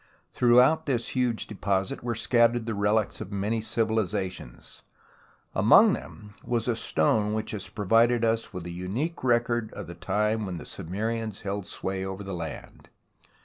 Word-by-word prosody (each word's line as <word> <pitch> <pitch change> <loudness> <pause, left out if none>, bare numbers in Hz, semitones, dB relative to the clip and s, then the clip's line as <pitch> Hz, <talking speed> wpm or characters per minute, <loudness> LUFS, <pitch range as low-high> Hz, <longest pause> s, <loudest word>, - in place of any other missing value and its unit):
Throughout 125 +7 +4
this 120 -4 -1
huge 125 -3 0
deposit 95 -2 -2
were 120 -1 -2
scattered 120 0 +2
the 115 - -2
relics 105 +1 0
of 95 - -7
many 105 +3 -1
civilizations, 105 - -2 0.7
among - - +6
them 105 -1 -8 0.2
a 120 0 +1
stone 105 +1 +1
which 110 0 -3
has 105 -3 -4
pro 105 -3 -5
vided 115 +3 +4
us 115 0 +1
with 90 -3 -7
a 85 - -5
unique 105 - -3
record 120 -2 +1
of - - -6
the 85 - -8
time 105 +4 -1
when 90 -2 -4
the 80 - -9
Sumerians 110 +4 -4
held 100 -1 -4
sway 95 0 -3
over 95 +1 -5
the 95 -1 -6
land. 85 -3 -7
110 Hz, 155 wpm, -27 LUFS, 95-115 Hz, 0.7 s, among